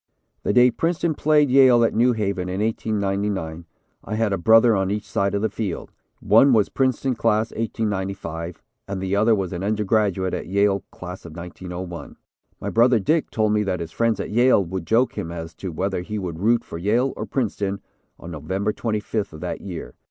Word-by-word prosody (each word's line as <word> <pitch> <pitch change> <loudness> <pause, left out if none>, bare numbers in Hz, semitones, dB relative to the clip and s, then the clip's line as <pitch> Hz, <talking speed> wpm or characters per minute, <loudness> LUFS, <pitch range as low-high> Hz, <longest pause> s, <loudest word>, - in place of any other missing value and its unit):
The - - 0
day 125 +3 +5
Princeton 165 +2 0
played 150 -2 +3
Yale 130 -3 +6
at 115 - +2
New 120 +2 +3
Haven 100 -4 -2
in 95 +1 -3
1899, 100 -6 -2 0.4
I 110 - -4
had 110 -2 +1
a - - 0
brother 115 +4 +5
on 95 -1 0
each 105 0 -3
side 100 +1 0
of 100 - -1
the - - +3
field; 105 -5 -4 0.3
one 125 +6 +5
was 110 -3 +3
Princeton 130 0 0
Class, 110 -1 +1
1895, 95 -6 -4 0.2
and 100 -1 -4
the 95 +1 -1
other 110 +2 +4
was 95 -3 -3
an 85 - -4
undergraduate 105 -3 0
at - - -4
Yale, 100 0 +2
Class 90 +1 -9
of 80 -2 -11
1901. 90 0 -7 0.4
My - - -4
brother, 120 +1 +4
Dick, 155 - +1
told 110 -1 +1
me 105 - +2
that 95 -3 -1
his 85 -1 -6
friends 115 +4 0
at - - -4
Yale 120 -3 +4
would 90 -1 -5
joke 120 +3 +2
him 85 - -4
as 80 -1 -7
to 95 +2 -6
whether 95 +3 -2
he 105 +4 -5
would 90 -5 -5
root 115 +4 +2
for 85 - -8
Yale 115 +8 +1
or - - -5
Princeton 100 -6 -2 0.4
on 85 - -9
November 95 +7 -2
25th 110 -3 -3
of 80 - -10
that - - -4
year. 90 -4 -7
100 Hz, 195 wpm, -23 LUFS, 95-115 Hz, 0.4 s, Yale